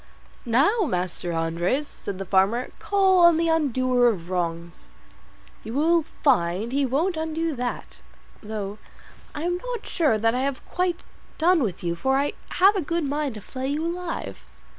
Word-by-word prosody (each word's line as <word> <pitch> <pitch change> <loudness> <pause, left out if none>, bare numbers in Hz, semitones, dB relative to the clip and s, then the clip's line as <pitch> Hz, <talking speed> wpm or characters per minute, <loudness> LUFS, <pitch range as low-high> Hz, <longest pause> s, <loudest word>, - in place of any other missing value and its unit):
"Now, 280 - +3
Master 180 - -2
Andres," 170 - 0
said 200 -8 -7
the 195 - -5
farmer, 195 +7 +2
"call 385 -2 +3
on 340 -2 +7
the 335 0 +1
undoer 255 -6 +2
of 180 -5 -4
wrongs; 170 -1 -3 0.7
you 225 +3 -6
will 330 +4 +3 0.2
find 210 - +2
he 275 0 +1
won't 320 +7 0
undo 320 0 -2
that, 245 0 -5 0.4
though 210 -1 -5 0.6
I 295 - -4
am 350 +1 0
not 485 +3 -6
sure 300 -10 +1
that 225 +1 +2
I 250 - 0
have 275 -1 -3
quite 360 -1 -1 0.4
done 340 +1 +4
with 195 -9 -2
you, 170 -1 0
for 265 +10 +1
I 285 +1 0 0.2
have 390 +3 +5
a 385 - 0
good 335 +2 -1
mind 285 -3 -2
to 210 - -8
flay 260 +5 -5
you 295 +3 -1
alive." 345 0 -4
270 Hz, 165 wpm, -24 LUFS, 205-330 Hz, 0.7 s, on